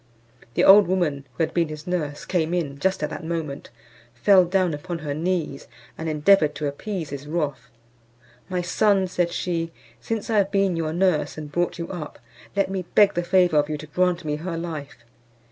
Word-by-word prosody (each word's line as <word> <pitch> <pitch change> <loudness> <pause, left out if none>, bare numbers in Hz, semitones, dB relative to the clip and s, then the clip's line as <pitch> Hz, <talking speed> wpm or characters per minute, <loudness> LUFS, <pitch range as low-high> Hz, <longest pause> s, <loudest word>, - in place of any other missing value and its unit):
The - - +3
old 200 0 +8
woman, 155 -7 0
who - - +2
had - - -2
been 170 -2 +2
his 150 -1 -8
nurse, 155 -5 -3
came 175 -2 0
in 145 -5 -3
just 190 -1 0
at 150 - -2
that - - -6
moment, 160 -4 -4 0.5
fell 185 - +5
down 180 -1 +1
upon 170 +4 -5
her 150 -3 -4
knees, 165 -3 -2 0.3
and 160 0 -4
endeavoured 155 0 +4
to 150 - -3
appease 160 +2 -4
his 140 0 -6
wrath. 150 -3 -3 0.8
"My 180 -1 -1
son," 195 +2 +2
said 175 -1 -1
she, 165 -2 -2 0.3
"since 225 -2 -3
I 225 - +1
have 195 -1 +2
been 195 -3 +2
your 160 -1 -1
nurse 175 -3 +1
and 150 -1 -7
brought 175 +3 -1
you 170 -1 -4
up, 165 -5 -7 0.4
let 200 -1 +2
me 190 -2 -3
beg 205 -2 +6
the 175 - 0
favour 180 -2 +3
of 145 0 +2
you 155 - -2
to 155 - -9
grant 180 +2 0
me 150 -1 -1
her 165 +1 -4
life. 155 -6 -6
170 Hz, 195 wpm, -24 LUFS, 150-185 Hz, 0.8 s, old